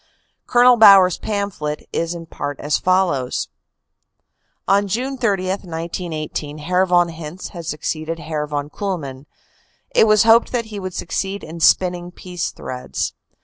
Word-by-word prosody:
Col. 245 0 +6
Bauer 200 -4 +9
s 180 - -2
pamphlet 200 -8 -3
is 170 +1 -1
in 165 -1 -8
part 145 -3 -5
as 150 +1 0
follows: 180 -9 +1 1.2
"On 200 +1 +3
June 250 +7 -2
30, 200 -7 0
1918, 165 -4 -4
Herr 180 +5 +1
von 175 -1 +3
Hintze 165 +2 -8
had 170 -3 -9
succeeded 155 +1 -3
Herr 155 -2 -4
von 145 0 -4
Kuhlmann. 150 -9 -5 0.7
It 220 - +5
was 215 0 +5
hoped 230 +1 +5
that 240 -2 -1
he 205 - -4
would 185 -2 -6
succeed 195 +3 -3
in 165 +2 -8
spin 180 +3 +4
ning 175 0 -7
peace 180 -1 -5
threads. 125 0 -5
175 Hz, 145 wpm, -20 LUFS, 155-195 Hz, 1.2 s, Bauer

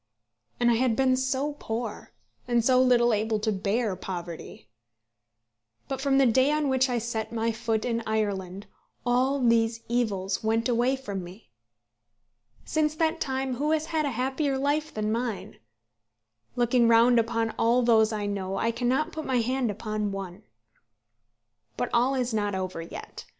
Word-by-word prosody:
And 240 0 +4
I 230 - +3
had 245 -2 +2
been 260 0 +3
so 265 +3 -1
poor; 225 -1 -5 0.4
and 240 -2 +2
so 255 0 +5
little 240 -2 +4
able 215 +1 0
to 215 +1 0
bear 205 +1 -1
poverty. 175 - -7 1.2
But 270 -1 -4
from 270 -1 +2
the 275 - +5
day 260 +4 +3
on 300 -2 +1
which 260 0 +2
I 245 - 0
set 225 -1 -3
my 230 0 0
foot 225 -1 -2
in 230 -1 -1
Ireland 200 -3 -2 0.4
all 255 +3 +2
these 230 -2 +2
evils 200 -6 -1
went 225 +2 +1
away 245 +2 +2
from 205 -8 -5
me. 180 - -13 1.1
Since 310 -1 0
that 325 +1 0
time 265 -2 -2
who 295 +3 0
has 315 0 +1
had 315 -2 -1
a 250 -5 -4
happier 270 +2 0
life 290 +3 0
than 215 0 -2
mine? 230 -2 -3 1.0
Looking 240 0 +3
round 235 +1 +5
upon 230 0 0
all 240 +2 +3
those 220 -2 +4
I 210 -1 -2
know, 195 -1 -3
I 230 - +1
cannot 255 +7 0
put 315 -1 -5
my 260 -1 +1
hand 255 +1 0
upon 210 0 -3
one. 195 -1 -6 1.4
But - - -2
all 250 +3 +3
is 250 -2 -1
not 205 -2 0
over 185 -3 -4
yet. 165 - -9
235 Hz, 160 wpm, -27 LUFS, 215-260 Hz, 1.4 s, so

